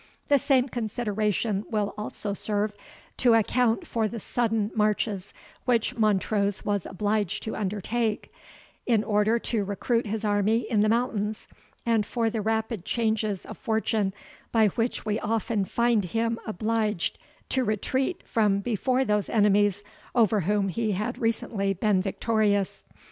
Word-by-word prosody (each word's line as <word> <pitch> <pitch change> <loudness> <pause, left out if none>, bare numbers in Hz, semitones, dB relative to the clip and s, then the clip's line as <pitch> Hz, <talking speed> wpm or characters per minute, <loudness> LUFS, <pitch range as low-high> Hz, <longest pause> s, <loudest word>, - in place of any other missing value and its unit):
The 285 -1 +5
same 260 -1 +3
consideration 215 -3 -1
will 210 -3 -1
also 210 -1 -4
serve 210 +1 -1 0.4
to 240 -2 +5
account 230 +1 +2
for 225 -2 0
the 230 +2 -5
sudden 225 -1 0
marches 210 -2 0 0.3
which 235 -3 +1
Montrose 205 -2 +1
was 205 -3 -1
obliged 205 0 -1
to 220 - -4
undertake, 210 +2 -2 0.5
in 225 -4 +3
order 210 +2 +2
to 225 -2 -1
recruit 220 +4 -1
his 220 +1 -2
army 210 +2 +2
in 220 - +1
the 215 +1 +4
mountains, 220 -3 -1 0.4
and 230 -2 +3
for 225 +1 -1
the 220 -1 -2
rapid 220 -2 -1
changes 220 -3 -1
of - - -9
fortune, 220 -2 0 0.4
by 220 -2 +4
which 230 +4 -2
we 215 0 0
often 220 -1 0
find 235 -1 +2
him 230 +4 -1
obliged 215 -2 -1 0.3
to 260 - +1
retreat 260 - -1
from 210 -3 +2
before 250 +5 0
those 210 -2 0
enemies 205 -2 +3 0.3
over 220 -3 +4
whom 200 +2 +1
he 220 +2 -1
had 215 +6 -3
recently 220 -4 0
been 195 0 +2
victorious. 205 0 0
215 Hz, 140 wpm, -26 LUFS, 205-230 Hz, 0.5 s, The